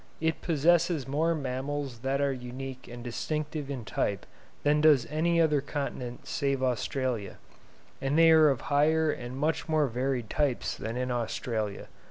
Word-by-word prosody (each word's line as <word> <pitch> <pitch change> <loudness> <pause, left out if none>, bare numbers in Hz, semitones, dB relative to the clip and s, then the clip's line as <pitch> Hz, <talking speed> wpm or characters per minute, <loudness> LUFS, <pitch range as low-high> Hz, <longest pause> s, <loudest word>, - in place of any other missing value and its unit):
It 160 0 0
possesses 165 -1 +2
more 160 +5 +1
mammals 135 -2 -3
that 135 +3 -1
are 140 -1 +2
unique 130 +1 -7
and 120 0 -9
distinctive 150 +4 -3
in 130 -5 -5
type 100 0 -1 0.4
than 150 +1 +3
does 150 -5 +5
any 170 +2 +2
other 150 -3 +3
continent 135 -4 -5
save 140 -2 -1
Australia; 125 -4 -1 0.6
and 135 +3 0
they 165 0 +7
are 155 -1 +7
of 135 -4 0
higher 155 +2 +3
and 125 0 -6
much 155 +3 -1
more 155 -1 +3
varied 125 -1 -1
types 140 +1 0
than 115 +2 -5
in 125 0 -1
Australia. 115 -3 -2
140 Hz, 155 wpm, -29 LUFS, 125-155 Hz, 0.6 s, they